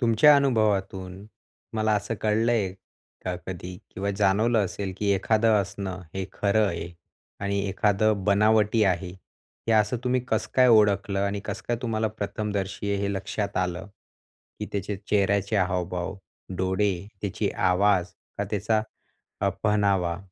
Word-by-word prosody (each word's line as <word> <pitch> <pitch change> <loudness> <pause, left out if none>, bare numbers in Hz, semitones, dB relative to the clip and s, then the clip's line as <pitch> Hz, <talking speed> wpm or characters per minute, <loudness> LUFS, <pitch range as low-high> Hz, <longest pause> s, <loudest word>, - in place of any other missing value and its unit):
तुमच्या 120 +5 +6
अनुभवातून 100 -7 0 0.5
मला 110 0 +1
असं 105 +3 -3
कळलंय 110 -2 +1 0.5
का, 90 - -1
कधी 90 0 -6 0.2
किंवा 100 +1 -2
जाणवलं 105 +3 +3
असेल, 95 +1 -4
की 105 -1 +1
एखादं 110 +2 +3
हसणं, 95 -1 -5
हे 95 0 -2
खरं 105 +1 +2
आहे 85 -2 -4 0.5
आणि 100 0 -1
एखादं 100 +1 +1
बनावटी 105 +2 +3
आहे. 90 -1 0 0.6
हे - - +4
असं 105 +2 +3
तुम्ही 125 0 +2
कसं 110 -1 0
काय 130 -1 +6
ओळखलं? 105 -3 +4
आणि 100 0 -1
कसं - - -5
काय 120 - +1
तुम्हाला 110 -2 0
प्रथमदर्शी 100 -1 -3
आहे 100 - -1
हे 100 0 0
लक्षात 100 +1 -3
आलं? 90 0 -1 0.7
की - - -4
त्याचे 100 0 -2
चेहऱ्याचे 100 +1 +2
हावभाव, 90 0 -1 0.4
डोळे, 95 +2 +1 0.3
त्याची 100 - -1 0.2
आवाज 95 -1 +3 0.3
का 100 - 0
त्याचा 105 +1 +1 0.6
अ, 100 - +2
पहनावा? 100 -5 +2
100 Hz, 135 wpm, -26 LUFS, 95-110 Hz, 0.7 s, तुमच्या